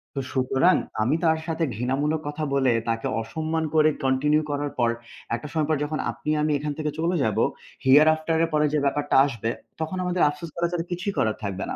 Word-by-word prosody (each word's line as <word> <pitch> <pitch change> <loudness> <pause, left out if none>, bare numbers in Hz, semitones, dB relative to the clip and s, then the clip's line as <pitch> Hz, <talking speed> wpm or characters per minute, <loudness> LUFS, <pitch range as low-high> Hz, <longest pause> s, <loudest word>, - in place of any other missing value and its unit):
তো - - -1
সুতরাং 135 +7 +3 0.3
আমি 135 +7 +2
তার 160 -1 +3
সাথে 165 0 -1
ঘৃণামূলক 140 +6 -1
কথা 150 +1 -4
বলে 135 -3 +3 0.2
তাকে 115 +4 -1
অসম্মান 160 +7 -2
করে 155 0 +5 0.2
continue 150 +4 +2
করার 145 0 -2
পর 120 -1 +3 0.5
একটা 150 - -7
সময় 155 -2 0
পর 155 - +2
যখন 155 +1 -3
আপনি 150 - -7
আমি 155 0 +1
এখান 150 0 -3
থেকে 150 -1 -1
চলে 170 +2 +1
যাবো 110 -2 +1 0.4
here 145 +4 +7
after 160 +1 -2
এর 165 - 0
পরে 150 0 +3
যে 150 - +3
ব্যাপারটা 145 +1 0
আসবে। 115 -5 -3 0.3
তখন 160 +4 -3
আমাদের 180 0 -1
আফসোস 150 +3 -7
করা 170 0 +1
ছাড়া 170 -1 -2
কিছুই 185 +3 -2
করার 110 -1 +1
থাকবে 95 -2 -3
না। - - -3
150 Hz, 205 wpm, -25 LUFS, 135-160 Hz, 0.5 s, here